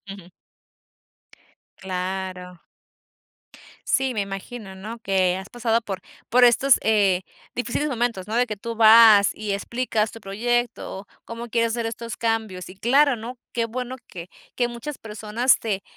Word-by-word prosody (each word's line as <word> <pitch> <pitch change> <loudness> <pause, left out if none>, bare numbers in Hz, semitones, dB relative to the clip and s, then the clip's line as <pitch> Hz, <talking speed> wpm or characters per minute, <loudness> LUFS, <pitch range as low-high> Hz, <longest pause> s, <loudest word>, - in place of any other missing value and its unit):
Ujú. 195 -2 -11 1.5
¡Claro! 185 -1 -5 1.3
Sí, 265 -2 +1
me 215 - -1
imagino, 195 +1 -6
¿no?, 215 +5 -8
que 190 -4 +1
has 190 +1 -7
pasado 230 -1 0
por 195 -4 -6 0.3
por 250 +1 +5
estos, 250 +2 +5
eh, 200 -4 +3 0.3
difíciles 250 +4 -1
momentos, 235 -7 -2
¿no?, 220 - -3
de 245 - +3
que 215 -3 -5
tú 230 +3 -6
vas 220 -2 +8
y 210 -1 -4
explicas 220 +1 -1
tu 225 - -11
proyecto, 225 -1 -2 0.2
cómo 230 +1 -7
quieres 230 0 +1
hacer 235 -1 -2
estos 230 0 -5
cambios, 220 -5 -2
y 185 - -12
claro, 270 +6 +3
¿no?, 235 +3 -8
qué 235 - 0
bueno 250 +2 -5
que 175 -2 -9 0.3
que 240 -1 0
muchas 240 +5 -7
personas 220 +3 +1
te 200 -4 -3
225 Hz, 145 wpm, -23 LUFS, 195-240 Hz, 1.5 s, vas